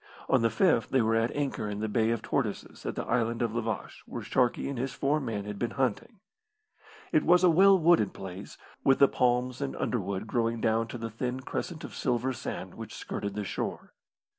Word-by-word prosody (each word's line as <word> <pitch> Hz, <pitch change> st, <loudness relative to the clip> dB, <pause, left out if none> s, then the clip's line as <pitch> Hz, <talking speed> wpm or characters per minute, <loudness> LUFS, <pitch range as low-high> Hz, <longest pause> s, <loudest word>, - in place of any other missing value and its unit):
On -, -, +3 dB
the 115 Hz, -, +3 dB
fifth 115 Hz, -, +2 dB
they 130 Hz, -3 st, +3 dB
were 110 Hz, +1 st, +2 dB
at 115 Hz, +1 st, +2 dB
anchor 140 Hz, -7 st, -2 dB
in 105 Hz, 0 st, -4 dB
the 110 Hz, -, -1 dB
Bay 110 Hz, +1 st, +1 dB
of 115 Hz, -1 st, -1 dB
Tortoises -, -, -3 dB
at -, -, -3 dB
the -, -, -3 dB
Island 115 Hz, 0 st, 0 dB
of 115 Hz, -2 st, -1 dB
La 120 Hz, -, 0 dB
Vache, 110 Hz, -1 st, -4 dB
where -, -, -6 dB
Sharkey 125 Hz, +1 st, +1 dB
and 135 Hz, -3 st, -4 dB
his 130 Hz, +1 st, -2 dB
four 145 Hz, +2 st, +1 dB
men 110 Hz, -7 st, -3 dB
had 105 Hz, -1 st, -6 dB
been 120 Hz, -, 0 dB
hunting. 135 Hz, -, -1 dB, 0.9 s
It 155 Hz, -, +3 dB
was 180 Hz, +1 st, +5 dB
a 180 Hz, -, +7 dB
well 195 Hz, +4 st, +7 dB
wooded 165 Hz, -, +4 dB
place, 95 Hz, 0 st, -8 dB, 0.3 s
with 135 Hz, -, +5 dB
the 140 Hz, -, +7 dB
palms 125 Hz, +1 st, +1 dB
and 140 Hz, -1 st, -2 dB
underwood 100 Hz, -3 st, -2 dB
growing 115 Hz, 0 st, 0 dB
down 110 Hz, +1 st, +1 dB
to 120 Hz, -, -6 dB
the 115 Hz, -1 st, -5 dB
thin 125 Hz, +3 st, -3 dB
crescent 160 Hz, +4 st, -4 dB
of -, -, -7 dB
silver 125 Hz, +1 st, 0 dB
sand -, -, -6 dB
which -, -, -8 dB
skirted 100 Hz, -1 st, -4 dB
the 105 Hz, -, -2 dB
shore. -, -, -4 dB
120 Hz, 215 wpm, -29 LUFS, 110-135 Hz, 0.9 s, a